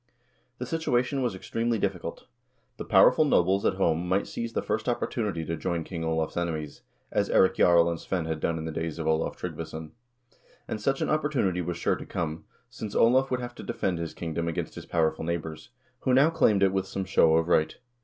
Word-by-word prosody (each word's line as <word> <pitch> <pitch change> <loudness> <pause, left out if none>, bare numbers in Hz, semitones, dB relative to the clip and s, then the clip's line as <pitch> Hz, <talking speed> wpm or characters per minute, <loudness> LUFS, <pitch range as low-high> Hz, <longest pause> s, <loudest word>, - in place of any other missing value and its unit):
The 125 - -4
situation 135 -3 0
was 120 -6 -1
extremely 115 +4 -1
difficult. 95 -4 -3 0.5
The - - -6
powerful - - +6
nobles 95 - +3
at - - +1
home 85 -2 0
might 95 +2 +2
seize 115 -1 -5
the - - -1
first 110 +3 -1
opportunity 105 -8 -2
to 80 - -2
join 85 +1 -2
King 85 -1 -6
Olav's 80 -1 -1
enemies, 80 -4 -3 0.3
as - - 0
Eirik 95 - +4
Jarl 85 -1 +5
and 85 -1 -2
Svein 90 -4 -2
had 80 -1 -3
done 85 +1 -1
in 80 - -5
the 80 - -3
days 80 0 -4
of 80 - -4
Olav 80 0 0
Trygg - - -5
vason; 80 -1 -7 0.8
and 110 - -4
such 135 +5 0
an - - 0
opportunity 135 - +1
was 85 0 -3
sure - - +1
to - - -8
come, 80 -1 -4 0.2
since 105 -2 -7
Olav 130 +3 +4
would 125 -1 -1
have 120 0 -6
to - - -10
defend 95 -7 -2
his 85 -1 -5
kingdom 85 0 -3
against 85 0 -3
his - - -9
powerful 80 -2 0
neighbors, 80 -2 -4 0.3
who 130 0 +2
now 140 +5 +5
claimed 110 -12 +3
it 95 -1 +3
with 95 -1 -1
some 95 0 -4
show 80 -4 +4
of 80 0 +2
right. 80 -3 +2
90 Hz, 210 wpm, -27 LUFS, 80-115 Hz, 0.8 s, powerful